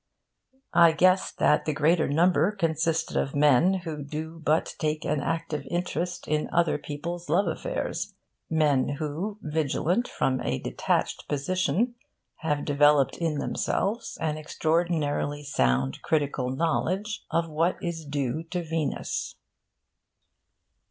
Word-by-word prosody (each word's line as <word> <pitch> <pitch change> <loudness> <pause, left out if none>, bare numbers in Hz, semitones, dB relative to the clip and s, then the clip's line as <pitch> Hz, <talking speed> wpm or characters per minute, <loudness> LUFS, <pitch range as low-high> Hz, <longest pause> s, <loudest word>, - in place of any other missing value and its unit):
I 170 -1 +7
guessed 185 +3 +3
that 150 - +3
the 155 - -1
greater 160 +3 +3
number 175 +5 +3
consisted 165 -3 0
of 135 - 0
men 150 +6 +4
who 155 -3 -4
do 160 +3 -6
but 155 +2 +1
take 155 -2 -1
an 150 -1 0
active 160 -3 -2
interest 175 0 -2
in 150 0 0
other 170 -3 +2
people's 170 +5 -6
love 200 - +3
affairs - - -3 0.3
men 145 -3 +2
who, 165 +9 -3
vigilant 160 - 0
from 130 -1 0
a 70 - -1
detached - - -1
position, 185 - 0 0.4
have 150 -3 -1
developed 145 -1 +4
in 165 -3 0
themselves 220 +9 -1
an 155 -1 -1
extraordinarily 155 -2 0
sound 65 - +1
critical 145 -4 0
knowledge 175 +9 -1
of 165 0 +1
what 165 +3 0
is 170 -2 -4
due 145 -1 -2
to 175 +1 -3
Venus. 160 -2 -2
160 Hz, 125 wpm, -27 LUFS, 145-175 Hz, 0.4 s, I